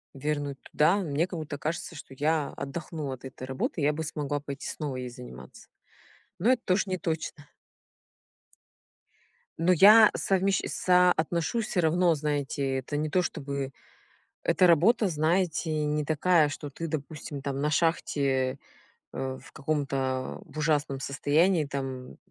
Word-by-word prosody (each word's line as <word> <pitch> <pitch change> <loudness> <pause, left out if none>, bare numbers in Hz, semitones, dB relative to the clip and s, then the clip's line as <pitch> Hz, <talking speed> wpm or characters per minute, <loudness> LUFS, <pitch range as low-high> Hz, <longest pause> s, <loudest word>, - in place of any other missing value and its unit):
вернуть 145 -1 -3
туда, 165 +7 +2
мне 165 -2 0
как 175 -3 -6
будто 150 -2 -6
кажется, 165 +2 -4
что 135 -2 -11
я 150 0 +1
отдохнула 145 -1 -5
от 130 - -14
этой 130 0 -8
работы. 135 +5 -2
Я 145 +1 +3
бы 160 +1 -4
смогла 145 -1 -2
пойти 140 -1 -7
снова 145 -4 -4
ей 125 -1 -4
заниматься. 120 - -12 0.7
Но 225 +9 +3
это 245 -2 +1
тож 190 +2 +2
не 185 -2 -3
точно. 160 -2 -4 2.1
Но 175 +3 +3
я 210 +5 +8
совмещ 195 0 +1
соотношу 180 +2 +2
всё 210 -4 0
равно, 170 +1 +3
знаете, 140 -2 -1
это 140 +3 -4
не 155 +1 -1
то, 180 +3 +2
чтобы 140 -3 -4 0.7
эта 180 - +4
работа, 195 +7 +4
знаете, 160 -1 0
не 150 0 0
такая, 155 0 +3
что 145 0 -6
ты, 165 +4 -5
допустим, 150 -1 -5
там 140 0 -3
на 150 - +1
шахте, 140 -5 +1 0.5
э, 130 0 -4
в - - -15
каком-то, 135 -3 -2
в - - -14
ужасном 150 -3 0
состоянии 150 +5 +2
там, 140 -1 -3 0.3
м, - - -15
150 Hz, 145 wpm, -28 LUFS, 140-170 Hz, 2.1 s, я